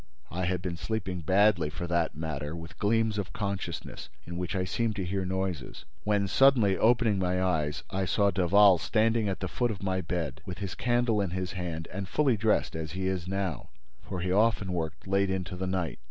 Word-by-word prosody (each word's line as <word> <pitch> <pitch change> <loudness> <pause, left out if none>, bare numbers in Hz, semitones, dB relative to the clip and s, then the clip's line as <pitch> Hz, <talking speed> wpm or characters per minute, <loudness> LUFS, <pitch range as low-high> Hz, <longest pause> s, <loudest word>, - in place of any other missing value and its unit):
I 90 +1 -2
had 90 0 -1
been 90 -2 -3
sleeping 95 -3 -3
badly, 95 -1 +3
for 85 +3 -5
that 85 -2 0
matter, 75 -1 -4
with 80 0 -10
gleams 110 0 +2
of 90 -4 -4
consciousness 100 -2 -4 0.2
in 85 - -7
which 90 +2 -3
I 95 - +1
seemed 110 +4 -1
to 95 -3 -2
hear 95 +1 -2
noises, 95 -6 -3 0.2
when, 105 -1 +2
suddenly 120 -4 +5
opening 115 -3 +3
my 90 0 +1
eyes, 80 -6 0
I 95 0 0
saw 100 +2 +2
Daval 95 +1 +5
standing 110 0 +2
at 95 - -3
the - - -1
foot 120 -1 0
of 105 -3 -5
my 95 -1 0
bed, 85 -2 -3
with 90 0 -6
his 100 -2 -4
candle 120 -3 +1
in 95 - -1
his 90 0 -3
hand 85 -3 -4
and 100 -1 -4
fully 135 +3 +3
dressed—as 85 -7 0
he 95 +1 -3
is 95 -2 -1
now, 95 -4 -3 0.3
for 90 - -5
he 90 +1 -1
often 105 -2 +2
worked 80 -3 -4
late 100 0 +2
into 95 -2 -2
the 95 +1 -3
night. 90 -3 -2
95 Hz, 200 wpm, -29 LUFS, 90-105 Hz, 0.3 s, suddenly